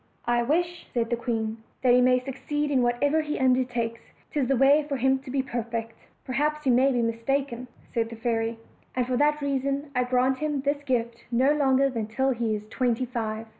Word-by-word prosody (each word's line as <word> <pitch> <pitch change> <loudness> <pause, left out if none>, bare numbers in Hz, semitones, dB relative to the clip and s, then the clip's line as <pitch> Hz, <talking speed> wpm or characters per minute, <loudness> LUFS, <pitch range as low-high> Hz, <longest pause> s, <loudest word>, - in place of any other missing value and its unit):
"I 240 0 +2
wish," 340 +7 -1
said 230 -1 -1
the - - +3
queen, 225 -2 -2 0.3
"that 250 -1 +5
he 250 - +6
may 255 0 +5
succeed 290 +3 -3
in 265 -3 +3
whatever 285 +6 +2
he 300 -1 -3
undertakes 245 -3 +1 0.3
'tis 280 -4 0
the 270 - +2
way 280 +4 +5
for 280 - -1
him 265 +1 +2
to 265 - -12
be 265 +1 0
per 245 -2 -3
fect." 230 0 -5 0.3
"Perhaps 300 +3 -1
you 260 - +4
may 260 +3 +4
be 245 -2 +1
mistaken," 240 +2 -1 0.3
said 225 -1 0
the 230 - -8
fairy, 225 0 -1 0.4
"and 250 -1 +1
for 255 0 -1
that 300 +1 +2
reason 275 +1 -1
I 250 -1 +2
grant 255 +1 +1
him 295 -2 -1
this 285 +1 -1
gift 235 -4 -2
no 255 +4 +3
longer 275 -2 +3
than 230 -5 -3
till 265 +5 0
he 230 -3 0
is 210 0 -7
twenty 245 +1 0
five." 225 -3 -4
255 Hz, 205 wpm, -26 LUFS, 235-275 Hz, 0.4 s, he